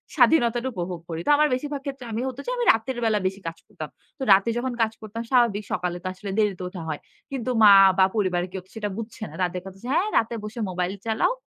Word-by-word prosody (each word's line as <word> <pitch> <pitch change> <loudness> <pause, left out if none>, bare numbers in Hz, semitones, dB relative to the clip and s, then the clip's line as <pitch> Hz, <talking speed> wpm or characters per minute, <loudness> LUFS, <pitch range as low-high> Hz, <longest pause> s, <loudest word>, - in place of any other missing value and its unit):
স্বাধীনতাটা 240 -4 +4
উপভোগ 175 -2 -4
করি। 165 0 -4
তো - - +2
আমার 300 +1 +4
বেশিরভাগ 285 +2 -3
ক্ষেত্রে 270 -2 -6
আমি 225 +2 -2
হত 260 - -5 0.2
আমি 485 - 0
রাতের 230 +3 -3
বেলা 215 -2 +2
বেশি 195 +1 -4
কাজ 165 0 -5
করতাম। - - -8 0.3
তো - - -15
রাতে 195 +4 +3
যখন 250 +1 -2
কাজ 220 -1 +2
করতাম 220 +2 -6
স্বাভাবিক। 235 -5 +3
সকালে 175 -1 -2
তো - - -3
আসলে 195 +1 -7
দেরিতে 200 -4 0
ওঠা 180 -2 -8
হয়। 150 - -3 0.3
কিন্তু 255 -2 -3
মা 205 - +10 0.3
বা 190 - +6
পরিবারে 180 -4 +1
কেউ 190 0 -5
তো - - -29
সেটা 210 -2 -3
বুঝছে 225 0 -7
না। - - -14
তাদের 180 0 -2
কথা 195 0 -10
যে, - - -6
"হ্যাঁ 370 +6 +2
রাতে 230 +1 +1
বসে 215 +2 -7
মোবাইল 180 +1 -2
চালাও। 225 - +1
215 Hz, 230 wpm, -24 LUFS, 185-240 Hz, 0.3 s, মা